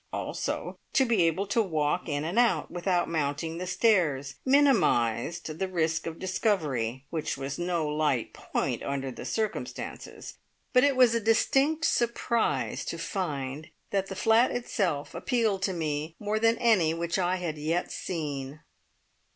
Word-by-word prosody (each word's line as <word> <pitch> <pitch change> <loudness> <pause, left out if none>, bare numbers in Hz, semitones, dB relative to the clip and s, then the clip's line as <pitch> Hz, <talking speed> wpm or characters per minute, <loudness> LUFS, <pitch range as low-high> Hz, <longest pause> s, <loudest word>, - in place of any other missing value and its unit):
Also, - - -3
to 265 - +4
be 230 -6 +2
able 185 +5 0
to 215 +3 +2
walk 160 -3 -1
in 145 0 -1
and 175 +9 0
out, 240 -1 +2
without 175 0 0
mounting 160 +1 -2
the 185 - -4
stairs, 160 - +2
minimised 170 - +2
the 190 - 0
risk 165 -3 0
of 165 0 -5
discovery, 145 - -1
which 160 -4 -2
was 135 +2 -4
no 175 -3 0
light 150 -5 0
point - - -2
under 135 -1 -3
the - - -8
circumstances, 220 -1 -4 0.3
but 250 -1 +6
it 285 -1 +4
was 250 -3 +6
a 230 - +2
distinct 270 +8 +2
surprise 235 - 0
to 165 - -4
find 155 -4 -4 0.2
that 195 -1 0
the 195 - -6
flat 225 +5 +4
itself 190 -11 -2
appealed 225 -6 0
to 195 - +1
me 155 -2 -3
more 210 +1 -1
than 225 +1 +3
any 185 -9 +3
which 170 +2 -1
I 180 0 +1
had 170 -4 -4
yet 165 +4 -1
seen. 145 -4 -4
175 Hz, 150 wpm, -28 LUFS, 150-215 Hz, 0.3 s, but